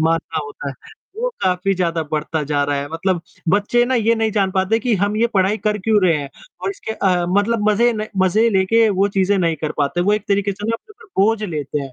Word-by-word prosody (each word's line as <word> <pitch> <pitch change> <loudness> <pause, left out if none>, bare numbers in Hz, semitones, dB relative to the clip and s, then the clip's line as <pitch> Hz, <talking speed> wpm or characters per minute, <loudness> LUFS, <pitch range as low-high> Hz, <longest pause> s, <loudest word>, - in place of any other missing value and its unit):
मारना 165 0 0
होता 145 0 -7
है, 135 - -6 0.4
वो - - -1
काफ़ी 185 +1 +1
ज़्यादा 170 -3 -1
बढ़ता 155 +1 -1
जा 145 0 0
रहा 145 0 -1
है, 140 +1 -3
मतलब 175 +1 0 0.3
बच्चे 205 +6 +3
ना 260 - 0
ये 230 -1 +3
नहीं 225 -1 0
जान 195 -2 +1
पाते 190 +4 +1
कि 235 0 0
हम 205 +1 -1
ये 230 +2 +3
पढ़ाई 195 +2 +2
कर 210 -1 -1
क्यों 210 0 +2
रहे 165 - +3
हैं 145 -2 -5 0.3
और - - -1
इसके 390 - -6
अ, 180 -4 +1
मतलब 210 +3 +1
मज़े 235 +3 +3
न 215 -1 -3 0.2
मज़े 215 +5 +3
लेके 220 +3 +3
वो 195 +1 +2
चीजें 195 +2 +3
नहीं 165 -3 +1
कर 155 - -3
पाते, 145 +4 0
वो 195 +4 +2
एक 210 -1 -1
तरीके 200 0 +1
से 205 +2 -7
ना 230 - +1
अपने 425 - -20
ऊपर 380 - 0
बोझ 215 +1 +2
लेते 150 -6 -3
हैं। 135 -2 -7
195 Hz, 240 wpm, -19 LUFS, 165-220 Hz, 0.4 s, बच्चे